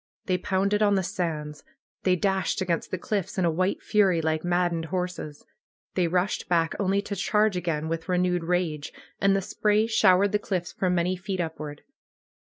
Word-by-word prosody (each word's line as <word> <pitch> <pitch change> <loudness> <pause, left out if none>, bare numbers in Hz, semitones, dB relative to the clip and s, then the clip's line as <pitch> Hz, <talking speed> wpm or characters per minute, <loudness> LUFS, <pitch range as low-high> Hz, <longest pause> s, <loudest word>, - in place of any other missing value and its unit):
They 180 -1 0
pounded 200 +3 +1
on 205 -1 +4
the 190 - +1
sands. 160 -6 -3 0.4
They 185 -1 +4
dashed 190 +1 0
against 175 -3 -1
the 185 - -2
cliffs 195 +1 -3
in 185 - +2
a 170 - +3
white 185 +4 -1
fury, 195 -5 +3
like 160 -1 0
maddened 175 -2 0
horses. 180 -4 -4 0.5
They 180 -2 +1
rushed 180 +3 -1
back, 165 -2 +2
only 200 0 +1
to 205 - -4
charge 210 +1 +2
again 165 -3 -2
with 165 +2 -4
renewed 180 -1 +1
rage, 165 -4 -1 0.3
and 195 0 +3
the 195 - 0
spray 210 +2 +2
showered 200 -3 +4
the 210 - +2
cliffs 185 -4 -3
for 185 - -1
many 180 +1 +1
feet 190 +1 -4
upward. 155 -3 -5
180 Hz, 175 wpm, -26 LUFS, 170-195 Hz, 0.5 s, on